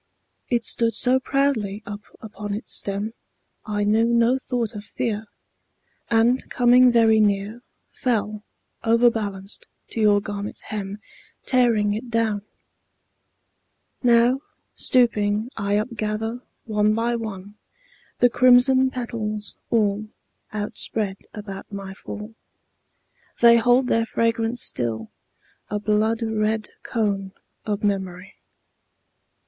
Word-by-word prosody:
It 235 -2 0
stood 230 -1 +1
so 255 +1 +4
proudly 255 -7 0
up 205 0 -7 0.2
upon 210 -2 -6
its 215 - -5
stem, 205 +3 -2 0.5
I 205 -1 -1
knew 215 +2 +3
no 235 +2 +3
thought 240 -3 -2
of 205 -1 -7
fear, 215 0 -3 0.8
And 235 +3 +2
coming 250 0 +5
very 225 -2 +5
near 205 +2 +1 0.3
Fell, 215 -4 -1 0.4
overbalanced, 225 -4 +1 0.2
to 225 - -3
your 205 -1 +5
garment's 205 0 -5
hem, 200 -1 -4 0.5
Tearing 230 -5 +3
it 230 +4 -5
down. 225 -3 0 1.6
Now, 245 +2 +4 0.3
stooping, 220 -2 +1
I 200 -1 -1
upgather, 220 +1 -2 0.2
one 210 -1 +2
by 235 +1 0
one, 205 -3 -6 0.7
The 245 - +6
crimson 255 +1 +5
petals, 220 -5 -4
all 215 -2 +1 0.4
Outspread 210 -1 -3
about 200 -2 -8
my 195 -1 -6
fall. 210 +3 -8 1.1
They 235 0 +7
hold 245 +3 +4
their 230 -2 +1
fragrance 230 +1 0
still, 110 -2 -1 0.6
a 210 - -1
blood 215 +2 +1
red 220 -1 -1
cone 200 -4 -2 0.3
Of 210 -1 -2
memory. 190 -2 -2
220 Hz, 110 wpm, -23 LUFS, 205-235 Hz, 1.6 s, They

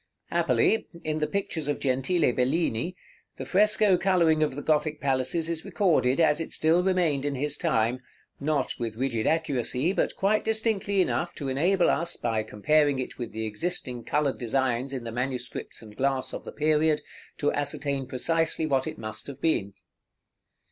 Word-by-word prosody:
Happily, 225 - +2 0.2
in 155 0 -2
the 150 - 0
pictures 170 -6 -3
of 145 - 0
Gentile 135 +2 +1
Bellini, 135 +4 0 0.4
the - - -6
fresco 210 -1 +4
coloring 170 -5 +3
of 150 -4 +1
the 145 - -5
Gothic 155 -1 +1
palaces 135 +4 0
is 165 -1 -2
recorded, 160 -8 +2
as 160 -2 +4
it 165 - -5
still 160 +3 +3
remained 180 -7 +1
in 145 -1 -1
his 145 +2 0
time; 125 -7 0 0.4
not 150 +1 0
with 115 -2 -3
rigid 115 -2 -1
accuracy, 145 0 0
but - - 0
quite 210 +2 +1
distinctly 220 -3 +1
enough 175 - -2
to 140 -3 -4
enable 175 +8 +2
us, 170 +1 -1
by 115 -2 -1
comparing 145 +7 +2
it 130 - -5
with 120 - -4
the 110 0 -4
existing 125 +1 -2
colored 145 -2 0
designs 130 +1 0
in 130 -3 -4
the 115 - -5
manuscripts 125 0 -4
and 105 -1 -13
glass 135 -1 0
of - - -6
the - - -6
period, 155 0 +2 0.4
to 145 - 0
ascertain 140 -2 -2
precisely 160 +5 0
what 135 -3 +1
it - - -5
must 110 -1 -6
have 140 -1 -8
been. 140 -11 +1
145 Hz, 170 wpm, -27 LUFS, 130-165 Hz, 0.4 s, fresco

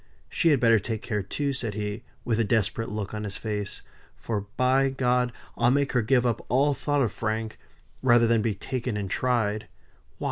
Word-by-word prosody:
She 170 - +2
had 145 -4 +4
better 115 -2 +5
take 110 +2 -4
care, 105 -4 -1
too," 140 +9 -2
said 115 -6 -4
he, 105 +1 -3 0.2
with 115 -2 +1
a - - +4
desperate 110 +1 0
look 105 -1 -4
on 105 0 -4
his 100 -2 -5
face, 105 -3 -4 0.3
"for 105 -3 -4
by 130 +2 +3
G 130 -1 -3
I'll 125 -1 +1
make 140 +2 +2
her 125 - +2
give 125 +2 +3
up 120 -2 0
all 140 +4 +3
thoughts 145 0 0
of 115 - 0
Frank, 110 0 -3 0.4
rather 120 -2 +5
than 115 -1 +3
be 110 -2 0
taken 125 +1 -3
and 100 -2 -4
tried. 110 -4 0
Why! - - -35
115 Hz, 200 wpm, -26 LUFS, 105-125 Hz, 0.4 s, better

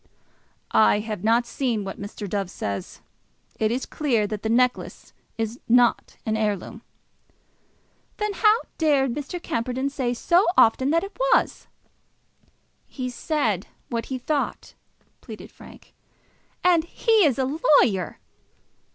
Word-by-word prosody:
"I 215 - +5
have 215 -3 -5
not 230 +2 +3
seen 235 -4 -2
what 195 0 -7
Mr. 205 0 -6
Dove 195 -1 -2
says. 100 - -5 0.6
It 215 - +2
is 250 +3 -2
clear 245 -8 0
that 210 0 -4
the 220 - -2
necklace 250 +2 0 0.2
is 225 +1 -3
not 240 0 +3
an 220 -1 0
heirloom." 210 -3 -2 1.4
"Then 420 -1 -1
how 435 +3 +4 0.2
dare 290 -4 +3
Mr. 290 +7 -4
Camperdown 255 -1 -2
say 250 -3 -2
so 345 - +3
often 260 +4 +5
that 330 +2 +2
it 395 - -8 0.2
was?" - - +1 1.2
"He 255 -2 -5
said 235 - -1 0.2
what 230 -1 -3
he 260 - -3
thought," 285 +3 -3 0.5
pleaded - - -10
Frank. - - -16 0.7
"And 350 -3 +4
he 440 +5 +2
is 280 -6 +3
a 270 +4 -1 0.2
lawyer!" 190 -6 0
245 Hz, 130 wpm, -24 LUFS, 220-295 Hz, 1.4 s, I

